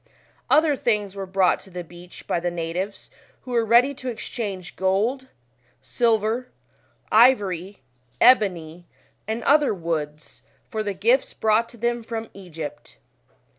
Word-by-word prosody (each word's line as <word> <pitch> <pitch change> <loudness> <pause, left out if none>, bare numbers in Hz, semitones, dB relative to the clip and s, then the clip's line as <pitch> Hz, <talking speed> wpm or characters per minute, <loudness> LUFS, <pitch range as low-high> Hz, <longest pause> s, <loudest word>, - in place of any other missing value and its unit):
Other 305 -1 +4
things 210 -6 -1
were 195 -1 -5
brought 190 -1 +2
to 195 - -15
the 180 -1 -6
beach 175 +1 -14
by - - 0
the 175 +1 -1
natives, 175 +4 -5 0.3
who 255 - -10
were 235 -1 +2
ready 240 +5 +4
to 260 -1 -6
exchange 200 -6 -6
gold, 215 +8 0 0.6
silver, 225 - 0 0.6
ivory, 205 -6 +3 0.4
ebony, 175 -8 +3 0.4
and 225 +1 -3
other 290 -5 +3
woods 155 -3 -5 0.3
for 220 - -2
the 205 -2 -3
gifts 235 +8 +1
brought 220 +1 +2
to 240 - -14
them 240 +1 -1
from 225 -1 -6
Egypt. 160 -6 -9
205 Hz, 135 wpm, -23 LUFS, 180-235 Hz, 0.6 s, Other